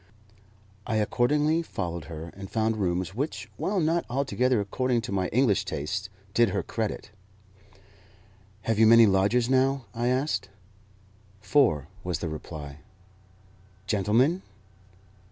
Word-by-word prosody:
I 110 - -1
accordingly 145 +9 +2
followed 85 - -5
her, 80 +1 -7
and 95 0 -8
found 110 0 0
rooms 90 -1 -1
which, 140 +8 -4
while 200 0 -1
not 165 +1 +1
altogether 130 -1 +1
according 120 +4 0
to 110 - -6
my 95 -2 0
English 115 -3 +2
tastes, 95 +7 -4 0.2
did 120 -2 +4
her - - -1
credit. 110 -2 -4 1.5
"Have 115 -1 0
you 110 - +7
many 115 0 +8
lodgers 105 +5 +2
now?" 135 0 +2
I 120 +1 -1
asked. 125 -7 0 0.9
"Four," 105 - +2 0.2
was 90 -3 -2
the 85 - -4
reply. 75 -2 -8 1.1
"Gentlemen?" 110 - +2
110 Hz, 120 wpm, -27 LUFS, 95-130 Hz, 1.5 s, many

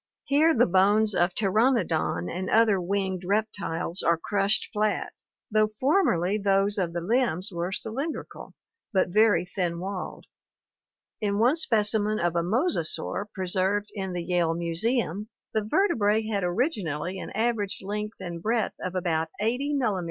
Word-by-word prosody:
Here 310 +3 +3
the 245 - +6
bones 205 +4 +3
of 175 0 +1
Pteranodon 195 - +1
and 185 - -4
other 215 -4 +4
winged 190 0 -2
reptiles 200 -3 -1
are 170 0 +2
crushed 200 +4 0
flat, 215 0 -1 0.4
though 215 0 +4
formerly 215 - +2
those 200 0 +2
of 175 -3 -1
the 170 - -2
limbs 210 -2 0
were 175 +1 -3
cylindrical, 255 +10 -5 0.4
but 190 -3 +2
very 210 0 +4
thin 175 -2 -2
walled. 190 0 -5 1.0
In 200 -1 0
one 240 +7 +4
spec 220 -10 +2
imen 215 0 +1
of 175 0 0
a 170 - +2
mosasaur 205 - 0
preserved 190 +2 -1
in 190 -3 -4
the 175 -1 -3
Yale 170 -2 +1
Museum 195 +4 0 0.2
the 220 - +1
vertebrae 220 - +2
had 205 -3 -1
originally 180 - -1
an - - -6
average 220 -4 -1
length 210 +2 -4
and 170 -3 -6
breadth 225 +2 0
of 185 0 -5
about 165 -3 0
80 250 +7 0
mm. 220 -8 0
200 Hz, 145 wpm, -26 LUFS, 180-220 Hz, 1.0 s, the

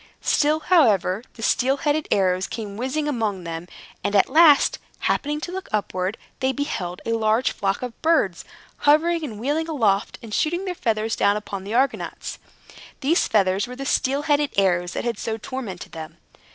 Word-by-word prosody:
Still, 305 +1 +2
however, 225 - +3
the 225 - -8
steel 265 +5 +2
headed 300 +1 0
arrows 185 -1 +2
came 210 -3 -6
whizzing 265 +6 -2
among 220 -9 -1
them; 165 +1 -6 0.4
and, 205 - -1
at 200 - +4
last, 310 -1 +6 0.2
happening 295 +1 0
to 350 - -5
look 380 +1 -6
upward, 190 -1 -1 0.2
they 260 0 +1
beheld 200 - -4
a 230 - -1
large 225 +2 +2
flock 195 +3 -2
of 245 -2 -7
birds, 310 - +2 0.3
hovering 325 +3 +3
and 225 -8 -6
wheeling 295 +7 -1
aloft, 220 -11 +1
and 220 -2 -8
shooting 345 - 0
their 365 - -2
feathers 225 -7 -1
down 205 +1 +2
upon 200 -2 -6
the 210 +3 -3
Argonauts. 265 +2 -1 0.6
These 310 +5 +2
feathers 195 0 +2
were 250 - -8
the 275 +1 -6
steel 275 +1 +1
headed 295 -1 +2
arrows 180 -2 +2
that - - -3
had 235 -3 -2
so 225 -1 -3
tormented 225 -6 -6
them. 160 -1 -8
235 Hz, 175 wpm, -23 LUFS, 200-295 Hz, 0.6 s, last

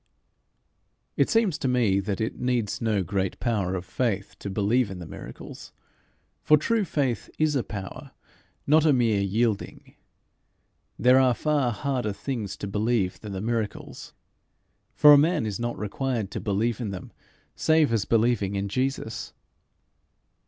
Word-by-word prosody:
It - - +2
seems 215 -9 +2
to 135 - -1
me 120 -6 +2
that 100 0 -3
it 110 0 -3
needs 125 -4 -1
no 110 -4 +1
great 95 +1 -2
power 100 -6 -1
of 90 0 -5
faith 100 -3 -2
to 100 - -5
believe 105 +4 +1
in 95 - -7
the 90 - -8
miracles 80 - -10 0.7
for 150 - +5
true 225 +8 +1
faith 135 - -1
is 155 -1 +1
a 135 - +2
power, 100 -3 -7 0.6
not 155 +2 +4
a 155 -2 +4
mere 115 -5 +2
yielding. 105 +2 -1 1.0
There 125 +1 +5
are 130 -2 +3
far 145 -4 +1
harder 125 -3 -2
things 105 -3 -4
to 100 - -5
believe 105 -1 0
than 105 -2 -8
the 95 - -4
miracles. 110 -1 -4 0.8
For 150 0 +8
a 145 - +8
man 160 -2 +2
is 105 -1 -3
not 120 0 -3
required 110 0 -3
to - - -4
believe 110 +3 -1
in 110 - -3
them 95 -2 -8 0.4
save 155 -5 +3
as 110 -3 +1
believing 115 -4 +1
in 100 0 -2
Jesus. 130 -1 -3
115 Hz, 150 wpm, -26 LUFS, 100-130 Hz, 1.0 s, For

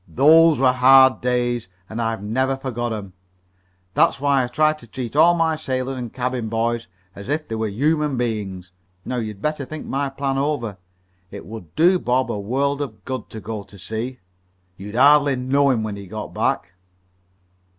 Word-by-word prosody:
Those 160 +3 +5
were 130 -1 +5
hard 130 +1 +6
days, 120 -2 0 0.2
and 110 +2 -4
I've 115 -3 -2
never 130 +5 0
forgot 120 -3 -3
'em. 100 -4 -6 0.8
That's - - +3
why 140 -1 +2
I - - -2
try 155 +5 +2
to 155 -6 -15
treat 125 +1 -6
all 170 +3 +6
my 165 -1 +1
sailors 130 -3 -3
and 120 -3 -5
cabin 125 -3 -3
boys 115 +1 -1 0.3
as 100 +5 -10
if 155 +1 -1
they - - -6
were 110 0 -1
human 150 +5 0
beings. 100 -7 -3 0.3
Now 125 - -3
you'd 110 -3 -5
better 150 -2 -1
think 155 +3 -7
my 140 +1 -2
plan 135 0 -2
over. 135 -8 -2 0.5
It - - -9
would 95 -5 -10
do 180 +3 +4
Bob 130 -1 0
a 105 - -3
world 140 +7 -1
of 120 -7 -7
good 130 -4 -5
to 110 - -8
go 105 +1 -5
to 100 0 -15
sea. 110 +7 -5 0.6
You'd 100 +4 -9
hardly 145 +1 +5
know 135 +3 +2
him 120 -4 +1
when 105 -2 -4
he 100 -1 -9
got 105 +2 -7
back." 90 - -1
125 Hz, 180 wpm, -21 LUFS, 110-140 Hz, 0.8 s, hard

